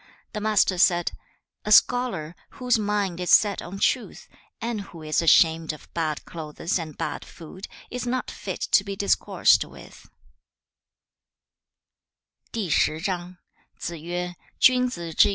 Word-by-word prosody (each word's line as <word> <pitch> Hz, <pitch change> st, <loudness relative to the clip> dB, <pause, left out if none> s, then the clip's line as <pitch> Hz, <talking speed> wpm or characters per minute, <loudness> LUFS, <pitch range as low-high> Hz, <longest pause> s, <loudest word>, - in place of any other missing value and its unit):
The 210 Hz, -, -4 dB
Master 205 Hz, -4 st, +2 dB
said, 175 Hz, -1 st, +3 dB, 0.5 s
'A 210 Hz, -, -3 dB
scholar, 210 Hz, -9 st, +3 dB, 0.2 s
whose 250 Hz, -3 st, +2 dB
mind 205 Hz, -4 st, -1 dB
is 180 Hz, -, -3 dB
set 205 Hz, -2 st, +5 dB
on 185 Hz, +3 st, -8 dB
truth, 245 Hz, +5 st, -1 dB, 0.3 s
and 230 Hz, -2 st, -3 dB
who 170 Hz, -5 st, -11 dB
is 155 Hz, +1 st, +1 dB
ashamed 165 Hz, -1 st, +4 dB
of 155 Hz, -, -15 dB
bad 155 Hz, -3 st, -2 dB
clothes 165 Hz, +2 st, -3 dB
and 155 Hz, -3 st, -7 dB
bad -, -, -4 dB
food, 185 Hz, +4 st, -11 dB, 0.2 s
is 250 Hz, 0 st, -4 dB
not 255 Hz, +1 st, -2 dB
fit -, -, -6 dB
to 195 Hz, -, +3 dB
be 200 Hz, 0 st, -5 dB
discoursed 200 Hz, +1 st, +3 dB
with.' -, -, -14 dB
190 Hz, 110 wpm, -25 LUFS, 165-215 Hz, 0.5 s, set